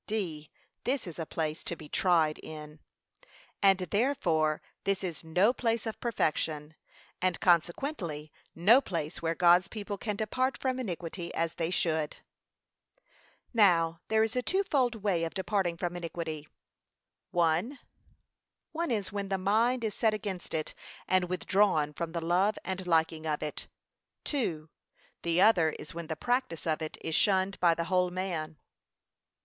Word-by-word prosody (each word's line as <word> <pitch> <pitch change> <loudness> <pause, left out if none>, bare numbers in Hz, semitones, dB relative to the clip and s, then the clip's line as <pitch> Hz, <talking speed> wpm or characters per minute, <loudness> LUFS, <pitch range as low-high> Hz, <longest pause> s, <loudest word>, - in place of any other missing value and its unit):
(d.) 170 -9 -3 0.3
This 270 +2 0
is 170 -2 -8
a 160 - -3
place 155 -1 -3
to 170 - -3
be 155 - -11
tried 160 -3 +2
in. 150 -1 -9 0.8
And 195 -1 +6
therefore 180 - +1 0.2
this 195 -1 0
is 175 -3 -4
no 180 +8 +3
place 230 -3 0
of 225 - -4
perfection, 155 -8 -1 0.5
and 185 -2 +1
consequently 170 - 0 0.2
no 215 +11 +6
place 165 - -4
where 165 0 0
God's 175 +1 +5
people 205 -2 -5
can 210 -3 -2
depart 255 +6 0
from 260 -1 -1
iniquity 175 -5 -4
as 165 0 0
they 165 -1 -2
should. 160 -4 0 1.4
Now 170 -7 +4
there 220 0 +3
is 225 +1 -1
a 250 - +2
twofold 280 -8 +1
way 185 -5 +1
of 165 - -3
departing 190 -3 0
from 175 0 -3
iniquity. 165 -3 -5 0.9
I. 170 - +2 0.9
One 335 0 -2
is 210 -5 -1
when 200 -1 -3
the 195 - +1
mind 225 +6 +2
is 215 -2 -1
set 220 0 +2
against 195 -6 -5
it, 155 -1 -2 0.3
and 185 -1 +2
withdrawn 185 -5 +2
from 165 +1 -4
the 170 - -2
love 190 +5 +2
and 190 -1 -4
liking 160 -1 +2
of 150 -1 -1
it. 150 - -5 0.7
II. 175 - -1 0.6
The 170 +1 +2
other 180 -7 +6
is 150 - -9
when 170 -1 -6
the 160 - -3
practice 245 -5 -1
of 160 -1 0
it 155 - -5
is 160 - -3
shunned 190 +2 +2
by 170 -2 +4
the 170 - -1
whole 180 +1 +2
man. 175 -4 -3
180 Hz, 155 wpm, -30 LUFS, 160-210 Hz, 1.4 s, And